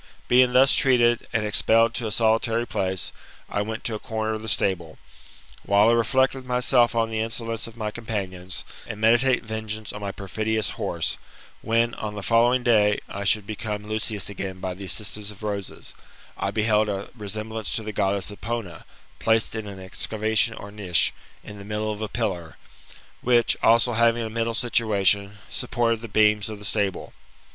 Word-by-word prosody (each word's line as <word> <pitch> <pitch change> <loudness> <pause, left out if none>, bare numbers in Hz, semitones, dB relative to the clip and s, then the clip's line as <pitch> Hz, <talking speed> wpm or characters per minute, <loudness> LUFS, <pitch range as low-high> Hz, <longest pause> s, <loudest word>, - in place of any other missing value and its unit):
Being 125 0 +5
thus 135 +2 +6
treated, 120 -3 +3
and 115 -2 0
expelled 115 +2 +3
to 115 -1 -2
a - - -4
solitary 115 +1 +2
place, 95 -5 -2 0.4
I 100 - -1
went 110 +2 -4
to 115 - -2
a 105 - -3
corner 110 0 -2
of 110 - -4
the 110 - -5
stable. 95 -4 +1
A - - -15
nd 80 - -21
while 100 +2 +5
I - - +5
reflect 130 +3 +3
with 135 -1 -8
myself 125 -1 +2
on 115 -1 +1
the 110 - -2
insolence 115 0 -2
of 115 0 -13
my 105 -2 -3
companions 95 -5 -4 0.2
and 105 - -6
meditate 120 +4 +4
vengeance 110 -1 -5
on 105 - -7
my 100 -1 -3
perfidious 110 +2 -2
horse, - - -2 0.4
when, 115 +1 +1
on 105 -1 -5
the 100 - -6
following 120 +5 +3
day, 105 -4 +4
I 100 - -5
should 105 +1 +2
become 105 -1 -5
Lucius 110 -1 -2
again 95 -2 -5
by 95 -1 -3
the 95 +2 -8
assistance 105 +1 -3
of 105 0 -11
roses, 100 -2 -5 0.4
I 95 - -2
beheld 105 +1 +2
a 100 0 -4
resemblance 110 +2 -3
o - - -8
f - - -12
the 110 - -5
(^ddess 100 +1 -1
Epona, 105 -6 -5 0.3
placed 110 -1 +2
in 110 -1 -4
an 100 -1 -8
excavation 110 +4 0
or 100 -1 -9
niche, 95 -5 +2 0.3
ia - - -8
Jthe 100 -1 -10
middle 105 0 -2
of 105 0 -6
a 110 - -3
'piTlar, 95 -8 -3 0.7
which," 120 -1 +3
also 115 +2 +4
Baving 115 0 +3
a 110 - -5
middle 115 0 -1
situation, 105 -4 +2
slipportea 115 -1 0
ttie 115 -1 -9
beams 105 0 +3
of 110 - -6
the 105 - -9
stable. 100 -3 -1
110 Hz, 185 wpm, -24 LUFS, 100-115 Hz, 0.7 s, thus